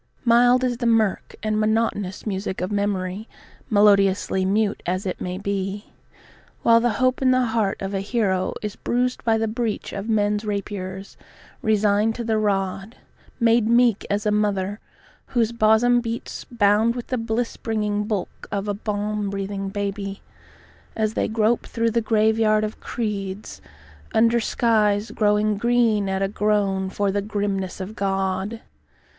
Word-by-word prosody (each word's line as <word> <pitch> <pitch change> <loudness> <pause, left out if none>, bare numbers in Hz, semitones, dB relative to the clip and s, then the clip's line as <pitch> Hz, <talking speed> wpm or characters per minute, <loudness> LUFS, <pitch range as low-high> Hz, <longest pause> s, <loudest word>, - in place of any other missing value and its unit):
Mild 245 +2 +5
is 245 -2 0
the 240 -1 -1
mirk 220 -4 +1
and 215 0 0
monotonous 215 -3 0
music 190 -2 -3
of 185 +3 -3
memory, 200 0 -2 0.4
melodiously 200 -2 +3
mute 205 +2 +1
as 185 +3 -1
it 185 - -4
may 180 0 -3
be, 200 +1 -4 0.7
While 230 0 +6
the 235 -1 +1
hope 255 0 +1
in 260 - +4
the 255 0 +3
heart 220 -4 0
of 195 +1 -3
a 195 - 0
hero 195 -3 0
is 210 -1 -4
bruised 250 +1 -1
by 225 -1 +2
the 225 0 0
breach 225 -1 -3
of 200 +3 -5
men's 210 -1 +1
rapiers, 200 -2 -5 0.4
resigned 215 0 +2
to 240 - -4
the 220 -1 0
rod; 195 +1 -1 0.4
Made 230 -1 +3
meek 235 -3 +4
as 205 +1 -1
a 210 - +2
mother 205 -1 0 0.6
whose 230 -1 +3
bosom 235 +2 +4
beats 230 0 -5
bound 220 0 +2
with 245 - -5
the 255 - -2
bliss 230 +1 -2
bringing 210 -2 -2
bulk 210 -4 -4
of 200 0 -2
a 205 - 0
balm 210 0 -2
breathing 195 0 -4
baby, 200 0 -4 0.7
As 215 -1 0
they - - 0
grope 220 +1 +1
through 230 -1 0
the 230 +1 +1
graveyard 220 -1 +2
of 215 0 -4
creeds, 205 -3 -4 0.5
under 230 +1 +4
skies 215 -2 +1
growing 210 0 +2
green 230 -3 +2
at 190 0 0
a - - +2
groan 200 -2 0
for 200 +1 0
the 200 +1 0
grimness 200 -3 -3
of 190 +3 -6
God. 195 +2 -2
210 Hz, 155 wpm, -23 LUFS, 200-225 Hz, 0.7 s, While